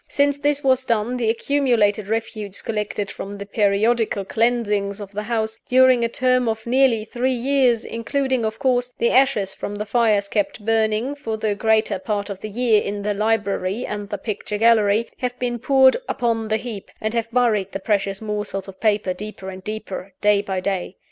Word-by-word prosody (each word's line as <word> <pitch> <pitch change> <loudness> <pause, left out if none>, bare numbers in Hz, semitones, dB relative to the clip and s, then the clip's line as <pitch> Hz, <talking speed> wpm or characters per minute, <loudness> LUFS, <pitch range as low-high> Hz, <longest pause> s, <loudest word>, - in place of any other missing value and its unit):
Since 285 0 +1
this 290 0 +1
was 260 -1 +3
done, 230 0 0
the 230 -3 0
accumulated 230 -5 +1
refuse 215 -2 -3
collected 210 -2 -3
from 200 - -7
the 200 0 -7
periodical 210 +1 +1
cleansings 210 -3 0
of 200 -2 -8
the 210 +1 -4
house, 220 0 -2
during 255 -1 +5
a 230 - +1
term 255 0 +2
of 220 0 -3
nearly 240 -3 +3
three 250 +3 -1
years 250 -2 +2
including, 260 +2 -1
of 220 0 -2
course, 250 -2 +1
the 235 - +2
ashes 255 -8 +3
from 205 - -6
the 210 +1 -4
fires 210 -2 +2
kept 205 0 -2
burning, 225 +3 +1
for 230 -7 -4
the 215 -1 0
greater 220 -1 +1
part 205 +1 -3
of 195 - -7
the 215 - -6
year, 225 -1 +2
in 205 0 -4
the 210 0 0
library 205 0 -1
and 205 -1 -5
the 205 - -3
picture 210 -1 -4
gallery 220 0 +4
have 250 -1 -3
been 240 -1 -2
poured 265 +1 +5
upon 230 -3 0
the 220 0 +1
heap, 220 -3 -7
and 215 +1 -2
have 230 -1 -1
buried 225 -5 +1
the 195 - -4
precious 200 0 -1
morsels 210 -2 -3
of 190 -1 -11
paper 210 -4 +1
deeper 195 0 -7
and 185 0 -10
deeper, 200 -3 -6
day 205 -1 +3
by 195 -2 -3
day. 185 -1 -3
220 Hz, 190 wpm, -22 LUFS, 205-240 Hz, -, during